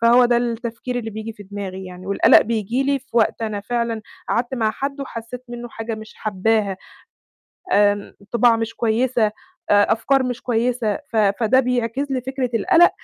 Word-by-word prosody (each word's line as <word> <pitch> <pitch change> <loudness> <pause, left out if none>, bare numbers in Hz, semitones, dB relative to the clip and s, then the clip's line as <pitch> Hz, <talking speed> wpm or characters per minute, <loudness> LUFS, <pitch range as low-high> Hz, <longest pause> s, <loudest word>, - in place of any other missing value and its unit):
فهو 240 +2 +6
ده 240 0 +3
التفكير 235 +1 -2
اللي 225 -2 -5
بييجي 220 +1 -6
في 205 - -12
دماغي 190 -1 -6
يعني، 185 0 -10
والقلق 200 - +6
بييجي 225 +3 -1
لي 280 0 +1
في 270 - -25
وقت 230 0 +2
أنا 210 -2 -2
فعلًا 235 0 -2 0.3
قعدت 240 +2 0
مع 220 -3 +1
حد 275 +4 -4
وحسّيت 250 -1 -7
منّه 240 0 -7
حاجة 225 0 -5
مش 220 0 -10
حبّاها، 210 -1 0 1.0
آمم، 205 0 +2 0.2
طباع 235 0 +4
مش 225 0 -3
كويسة، 235 +1 +1 0.5
آآ 205 +1 +5
أفكار 270 +4 +2
مش 245 -2 -3
كويسة، 235 -2 0
ف - - -2
فده 220 +5 +3
بيعكس 250 +2 -1
لي 260 -1 0
فكرة 265 0 -3
القلق، 350 +6 +5
230 Hz, 170 wpm, -21 LUFS, 215-250 Hz, 1.0 s, فهو